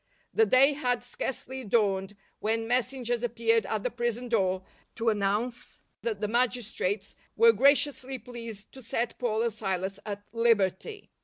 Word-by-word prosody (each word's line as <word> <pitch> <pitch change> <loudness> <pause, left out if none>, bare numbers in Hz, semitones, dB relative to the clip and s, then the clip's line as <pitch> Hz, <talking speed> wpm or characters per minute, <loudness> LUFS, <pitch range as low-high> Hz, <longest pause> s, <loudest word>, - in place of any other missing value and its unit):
The 445 0 +4
day 270 +3 +6
had 250 -4 -1
sca.rcely 255 -1 -5
dawned 195 -2 +1 0.2
when 225 +1 -1
messengers 245 -1 0
appeared 230 -3 +1
at 215 -1 -2
the 250 - -1
prison 240 +1 -2
door 190 -4 +1 0.3
to 230 0 +1
announce 210 +4 -2 0.2
that 215 -3 -3
the 210 - 0
magistrates 220 -4 -1 0.2
were 230 +1 +7
gra 275 +6 +7
ciously 270 -2 -1
pleased 230 -3 -8
to 265 - -12
set 230 0 -2
Paul 225 -2 0
and 235 -2 0
Silas 195 -1 -2
at 205 -1 -5
liberty. 230 - +1
230 Hz, 150 wpm, -28 LUFS, 210-245 Hz, 0.3 s, were